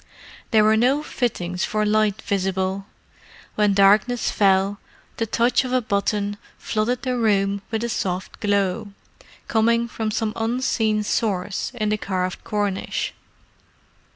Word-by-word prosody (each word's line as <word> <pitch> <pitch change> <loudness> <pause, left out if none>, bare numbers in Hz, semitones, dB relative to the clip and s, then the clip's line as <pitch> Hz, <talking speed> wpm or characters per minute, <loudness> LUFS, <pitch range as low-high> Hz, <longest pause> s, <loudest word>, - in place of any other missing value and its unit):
There 220 -2 +5
were 215 +1 +5
no 265 +6 +2
fittings 180 - -2
for 215 0 0
light 215 0 +1
visible: 190 0 -1 0.7
when 210 -2 +2
darkness 210 +5 +4
fell, 195 0 +2 0.4
the 225 - -1
touch 235 +4 +2
of 255 - -4
a 255 - +4
button 205 -2 -1 0.2
flooded 235 +3 -1
the 255 -1 -1
room 200 -4 +1
with 225 0 -2
a - - 0
soft 185 -4 -3
glow, 200 0 0 0.5
coming 230 +1 +2
from 220 -1 -3
some 215 0 -1
unseen 225 -2 0
source 205 -3 -1
in 215 -3 -1
the 210 0 0
carved 185 -2 -3
cornice. 205 -2 -2
210 Hz, 130 wpm, -23 LUFS, 195-225 Hz, 0.7 s, There